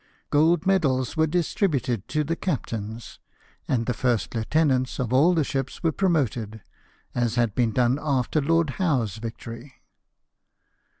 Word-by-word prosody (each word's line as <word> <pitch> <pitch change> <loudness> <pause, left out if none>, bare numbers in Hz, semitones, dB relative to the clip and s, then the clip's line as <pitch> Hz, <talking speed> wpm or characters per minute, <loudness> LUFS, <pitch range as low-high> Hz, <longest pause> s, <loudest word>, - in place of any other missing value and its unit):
Gold 160 +4 +3
medals 140 -10 +1
were 160 0 +3
distributed 150 - 0
to 155 0 0
the 165 +3 -2
captains, 115 - -4 0.5
and 115 -3 0
the 125 - 0
first 120 -1 0
lieutenants 130 +2 +1
of 125 -2 -2
all 160 +7 +5
the 160 - +2
ships 135 +1 -4
were 165 - +3
promoted, 125 - -1 0.5
as 120 -1 0
had 120 -3 +1
been 120 -1 +1
done 125 +3 +2
after 140 0 0
Lord 165 0 +2
Howe's 130 - 0
victory. 115 +3 -8
130 Hz, 135 wpm, -25 LUFS, 115-160 Hz, 0.5 s, all